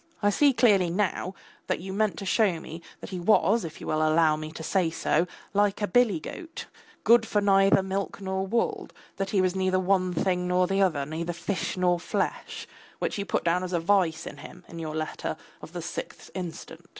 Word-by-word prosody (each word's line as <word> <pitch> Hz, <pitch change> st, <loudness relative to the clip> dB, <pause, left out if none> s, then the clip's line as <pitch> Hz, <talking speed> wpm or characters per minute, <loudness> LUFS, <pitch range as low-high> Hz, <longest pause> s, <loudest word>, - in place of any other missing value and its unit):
I 205 Hz, -, +4 dB
see 285 Hz, +7 st, +4 dB
clearly 205 Hz, -8 st, +4 dB
now 185 Hz, 0 st, -1 dB, 0.3 s
that -, -, 0 dB
you 190 Hz, +2 st, -6 dB
meant 215 Hz, 0 st, 0 dB
to 200 Hz, -, -6 dB
show 190 Hz, -4 st, +2 dB
me 160 Hz, +1 st, -9 dB, 0.2 s
that -, -, -8 dB
he 185 Hz, -, -4 dB
was, 205 Hz, +3 st, +3 dB
if 160 Hz, -1 st, -7 dB
you -, -, -8 dB
will 155 Hz, -, 0 dB
allow 155 Hz, 0 st, +4 dB
me 155 Hz, 0 st, -6 dB
to 160 Hz, -, -7 dB
say 180 Hz, 0 st, +1 dB
so, 165 Hz, +1 st, +1 dB, 0.3 s
like 205 Hz, 0 st, +2 dB
a 205 Hz, -, 0 dB
billy 210 Hz, -3 st, +3 dB
goat, 330 Hz, -, -8 dB, 0.4 s
good 235 Hz, 0 st, +6 dB
for 215 Hz, -2 st, 0 dB
neither 195 Hz, -1 st, +4 dB
milk 195 Hz, +1 st, -3 dB
nor 190 Hz, 0 st, -2 dB
wool, 230 Hz, +4 st, -1 dB, 0.3 s
that 195 Hz, 0 st, -2 dB
he 195 Hz, -, +2 dB
was 185 Hz, 0 st, +1 dB
neither 185 Hz, 0 st, +1 dB
one 185 Hz, -1 st, +2 dB
thing 180 Hz, +1 st, 0 dB
nor 180 Hz, 0 st, +3 dB
the 195 Hz, +2 st, +1 dB
other, 155 Hz, -8 st, +2 dB
neither 165 Hz, +3 st, -4 dB
fish 180 Hz, +3 st, -3 dB
nor 180 Hz, -1 st, +2 dB
flesh, -, -, -3 dB, 0.3 s
which -, -, -2 dB
you 200 Hz, -, -2 dB
put -, -, 0 dB
down 175 Hz, +2 st, +1 dB
as 185 Hz, 0 st, -4 dB
a 170 Hz, -, +2 dB
vice 170 Hz, -2 st, +2 dB
in -, -, -8 dB
him 180 Hz, +5 st, -12 dB
in 170 Hz, -, -9 dB
your 155 Hz, -1 st, -4 dB
letter 155 Hz, 0 st, -3 dB, 0.2 s
of -, -, -10 dB
the -, -, -6 dB
sixth -, -, -7 dB
instant. 170 Hz, -2 st, -7 dB
185 Hz, 210 wpm, -27 LUFS, 170-200 Hz, 0.4 s, good